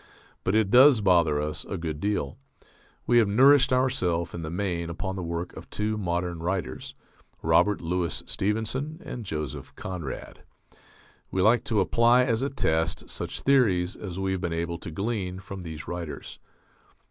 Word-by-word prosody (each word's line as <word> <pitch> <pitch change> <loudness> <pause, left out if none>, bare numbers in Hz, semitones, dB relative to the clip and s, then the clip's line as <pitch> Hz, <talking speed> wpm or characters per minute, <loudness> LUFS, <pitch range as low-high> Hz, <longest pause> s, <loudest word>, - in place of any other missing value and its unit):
But 95 - +1
it 110 -3 +2
does 130 0 +8
bother 85 -7 +3
us 75 +1 -3
a 95 - -5
good 80 -3 -4
deal. 100 -8 -2 0.7
We 120 -1 +5
have 110 - +4
nourished 135 +7 +6
ourself, 125 -11 +1
in 85 - -5
the 80 - -4
main, 85 -1 -2
upon 95 +3 -4
the 95 - -4
work 85 0 -4
of - - -10
two 105 +1 -1
modern 85 -3 -2
writers: 85 -6 -3 0.5
Robert 105 -1 +3
Louis 85 -1 -2
Stevenson 110 - -2
and 120 -5 -6
Joseph 75 -4 -5
Conrad; 90 -7 -6 0.9
we 95 - 0
like 110 +3 +4
to 110 -4 +2
apply 120 +5 +4
as 120 -2 0
a 140 - 0
test 80 - -1
such - - -4
theories 100 -10 +3
as 95 -4 -7
we 95 0 -1
have 95 -1 -2
been 85 - -2
able 85 0 -3
to - - -7
glean 95 +1 -3
from 95 0 -8
those 80 -3 -8
writers. 85 -3 -6
95 Hz, 165 wpm, -27 LUFS, 85-110 Hz, 0.9 s, does